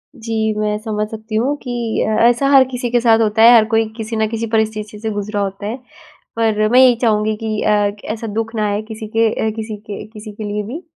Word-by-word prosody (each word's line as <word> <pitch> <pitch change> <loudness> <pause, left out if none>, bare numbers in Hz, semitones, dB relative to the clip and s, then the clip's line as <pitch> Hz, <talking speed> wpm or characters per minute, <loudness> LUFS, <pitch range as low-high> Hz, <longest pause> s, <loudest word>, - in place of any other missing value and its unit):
जी, 220 -2 -2
मैं 210 0 0
समझ 215 -1 -3
सकती 220 0 -7
हूँ 255 +7 +1
कि 240 -3 -2
अ, - - 0 0.2
ऐसा 245 +3 +1
हर 275 -2 +7
किसी 245 -1 -3
के 240 - +3
साथ 225 -1 +4
होता 220 0 +1
है, 235 +2 +9
हर 220 -2 +6
कोई 225 0 +3
किसी 225 0 -5
न 220 0 +1
किसी 230 0 -3
परिस्थिति 215 -1 -2
से 220 +1 -3
गुज़रा 205 0 -3
होता 195 0 -4
है, 225 +4 -4 0.6
पर 220 -2 +1
मैं 250 +3 +5
यही 255 -2 +6
चाहूँगी 215 -2 +1
कि 215 -1 -2
अ, 205 -1 +2 0.2
ऐसा 225 0 -6
दुःख 225 +2 -3
ना 215 -1 0
आए 205 +1 -1
किसी 220 0 -7
के 225 0 +4 0.2
अ, - - +2
किसी 220 -1 -5
के 205 0 -8
किसी 215 0 -10
के 210 +1 -8
लिए 210 0 -3
भी, 290 +9 -6
220 Hz, 235 wpm, -18 LUFS, 210-230 Hz, 0.6 s, है